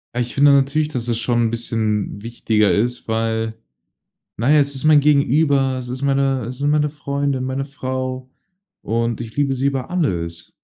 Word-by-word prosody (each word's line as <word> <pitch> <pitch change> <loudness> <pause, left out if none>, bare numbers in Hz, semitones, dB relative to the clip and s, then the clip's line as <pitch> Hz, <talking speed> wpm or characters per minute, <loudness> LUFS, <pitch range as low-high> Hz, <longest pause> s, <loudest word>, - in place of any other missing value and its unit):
Ah, - - -1
ich 120 0 -4
finde 145 +1 +6
ja 140 - +6
natürlich 145 +3 +1
dass 125 -6 -4
es 120 -2 0
schon 120 +1 0
ein 115 - +2
bisschen 110 -3 -2
wichtiger 110 -2 +1
ist, 120 +4 -1
weil 110 0 -1 0.8
Naja, 140 +7 +3
es 140 -1 +1
ist 135 - -6
mein 155 -1 +6
Gegenüber, 140 -2 +2
es 125 -1 -7
ist 130 +2 -6
meine 135 -2 +1
es 125 +1 -7
sind 145 +1 +1
meine 150 0 +2
Freundin, 140 -2 -2
meine 130 +1 -2
Frau. 130 -2 -5 0.5
Und 115 +1 -1
ich 115 -2 -8
liebe 140 -2 +1
sie 135 +1 -1
über 135 0 -2
alles. 85 - -2
130 Hz, 185 wpm, -20 LUFS, 115-140 Hz, 0.8 s, finde